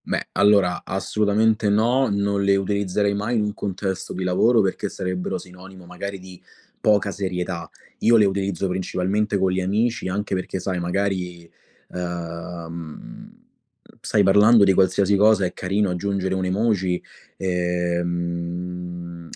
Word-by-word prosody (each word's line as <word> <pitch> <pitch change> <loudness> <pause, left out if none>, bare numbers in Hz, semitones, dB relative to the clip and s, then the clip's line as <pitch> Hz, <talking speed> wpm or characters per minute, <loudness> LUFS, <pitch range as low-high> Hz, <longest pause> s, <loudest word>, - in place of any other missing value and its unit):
Beh, - - -3
allora, 100 -3 +3
assolutamente 105 +3 +1
no, 120 +5 +3
non 100 0 0
le 100 0 +4
utilizzerei 100 +1 0
mai 105 +4 -1
in 110 - +2
un 105 0 -2
contesto 95 -1 -4
di 95 - -3
lavoro 110 +6 +3
perché 95 +1 -1
sarebbero 95 0 -3
sinonimo 90 +1 -12
magari 100 +3 -6
di 95 -1 -13 0.4
poca 105 -1 +3
serietà. 90 -2 -4 0.3
Io 115 0 +5
le 105 - +5
utilizzo 95 -1 -1
principalmente 95 +3 -1
co' 95 -1 +1
gli 95 0 0
amici, 110 +4 0
anche 100 +2 -2
perché 95 0 -2
sai 95 -1 -2
magari, 90 -1 -2 0.4
uhm, 85 -2 -7 0.7
stai 105 - +2
parlando 105 +3 +6
di 95 -1 +5
qualsiasi 95 +2 +3
cosa, 105 -1 +4
è 90 - -3
carino 95 +1 0
aggiungere 95 +1 -1
un'emoji. 95 -1 0 0.3
Ehm, 85 -1 -3
95 Hz, 130 wpm, -23 LUFS, 90-100 Hz, 0.7 s, parlando